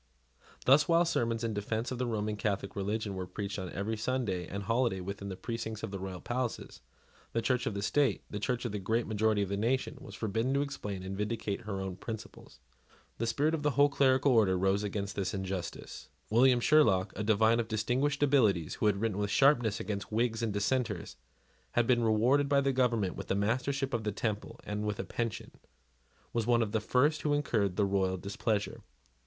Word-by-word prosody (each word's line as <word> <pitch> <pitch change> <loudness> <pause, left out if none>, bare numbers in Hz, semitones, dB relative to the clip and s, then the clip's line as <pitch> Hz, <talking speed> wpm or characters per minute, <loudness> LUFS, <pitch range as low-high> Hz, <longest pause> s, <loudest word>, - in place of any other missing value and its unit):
Thus, 140 +3 +6
while 170 +1 +4
sermons 115 -7 0
in 115 -1 -1
defence 110 +4 -2
of 125 - -4
the 125 - 0
Roman 105 -2 -1
Catholic 100 -2 -2
religion 105 +1 -2
were 95 -1 -4
preached 100 +1 -4
on 95 -1 -5
every 105 +5 -3
Sunday 105 -6 -2
and 100 +1 -5
holiday 115 -1 +1
within 100 +2 -5
the 95 - -5
precincts 110 -1 -5
of - - -4
the 100 - -5
royal 95 -1 -5
palaces, 120 -1 -4 0.5
the 115 - +1
Church 125 +1 +1
of 100 - -2
the 100 - -3
state, 135 -2 +1
the 105 - -5
Church 125 +3 -2
of 120 - -2
the 105 - -3
great 110 +5 0
majority 110 -1 +1
of 95 - -4
the 100 - -1
nation, 125 +5 -1
was 100 - -10
forbidden 115 +6 -1
to 140 - +2
explain 105 -9 -5
and 95 +1 -5
vindicate 105 +1 -2
her 100 -2 -3
own 95 -1 -4
principles. 110 - -8 0.6
The 115 - 0
spirit 145 +8 +1
of 160 - -1
the 145 - +2
whole 145 0 +6
clerical 135 0 +3
order 105 -6 +4
rose 95 +2 +2
against 100 -1 -3
this 95 0 -2
injustice. 95 -7 -5 0.2
William 125 +2 +5
Sherlock, 105 -10 +4
a 105 - -3
divine 110 +2 +3
of 115 - -1
distinguished 125 +7 0
abilities, 110 - +3
who 110 - 0
had 100 -1 +2
written 105 -2 -1
with 105 -1 -1
sharpness 120 -3 +3
against 100 -1 -4
Whigs 115 0 0
and 115 -2 0
Dissenters, 105 -1 -1
and - - -38 0.5
had 120 - +3
been 120 -1 +3
rewarded 120 +6 +3
by 140 -1 +4
the 135 -1 +1
government 115 -7 +1
with - - -7
the - - 0
Mastership 130 +6 0
of 115 -2 -1
the 105 - -1
Temple 105 0 -3
and 105 0 -3
with 105 -1 -2
a - - -1
pension, 115 -3 -4 0.8
was 115 -1 -1
one 120 -1 +4
of 105 - -4
the 110 0 0
first 145 +7 +2
who 145 -1 +1
incurred 110 -10 0
the 100 - +2
royal 95 -1 +1
displeasure. 100 +3 -2
110 Hz, 205 wpm, -31 LUFS, 100-125 Hz, 0.8 s, Thus